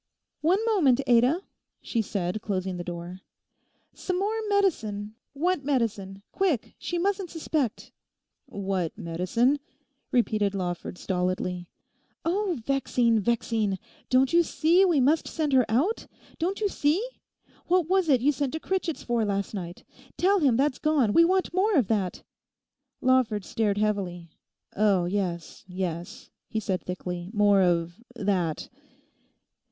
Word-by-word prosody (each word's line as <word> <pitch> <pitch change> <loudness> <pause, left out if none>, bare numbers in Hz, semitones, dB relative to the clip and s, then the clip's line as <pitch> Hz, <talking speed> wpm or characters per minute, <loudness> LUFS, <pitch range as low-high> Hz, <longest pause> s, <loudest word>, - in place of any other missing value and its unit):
'One 340 +5 +3
moment, 320 - +3
Ada,' 250 +8 +3 0.4
she 230 - -1
said 195 -1 -3
closing 190 -3 -2
the 175 - -4
door. 175 +1 -7 0.7
'Some 365 -1 -3
more 405 +3 0 0.2
medicine—what 285 - -1
medicine? 210 -8 -1
Quick! 355 - 0
She 350 - -3
mustn't 385 0 -1
suspect.' 310 -7 -2 0.6
'"What 190 -4 -3
medicine?"' 185 - +1 0.5
repeated 215 -4 +1
Lawford 180 -1 -4
stolidly. 180 -1 -2 0.6
'Oh, 370 0 0
vexing, 245 -4 +2
vexing; 220 -2 0 0.3
don't 260 +3 +3
you 340 - +6
see 335 +2 +3
we 340 -6 +3
must 295 +5 +3
send 305 -4 -1
her 255 -3 +4
out? 295 - 0 0.3
Don't 375 +6 -1
you 415 - +3
see? 305 -3 +1 0.7
What 355 -2 +2
was 375 -2 +2
it 260 -4 +4
you 285 +4 +4
sent 280 -1 -2
to 320 - -2
Critchett's 365 -3 -2
for 240 -2 0
last 200 -1 -2
night? 175 -3 -6 0.3
Tell 390 +3 +3
him 270 -8 +3
that's 275 0 +1
gone: 295 -9 +2
we 335 - +7
want 370 +2 +1
more 395 +3 +2
of 255 - +3
that.' 200 -5 -1 0.8
Lawford 250 -6 +2
stared 215 -3 0
heavily. 190 -5 -2 0.4
Oh, 200 -4 +3
yes, 175 -3 -3
yes,' 180 -1 -5 0.2
he 220 - -2
said 190 -3 -2
thickly, 180 -1 -5
'more 205 -2 +4
of 175 +1 +1
that.... 190 -7 -1
230 Hz, 135 wpm, -27 LUFS, 190-315 Hz, 0.8 s, we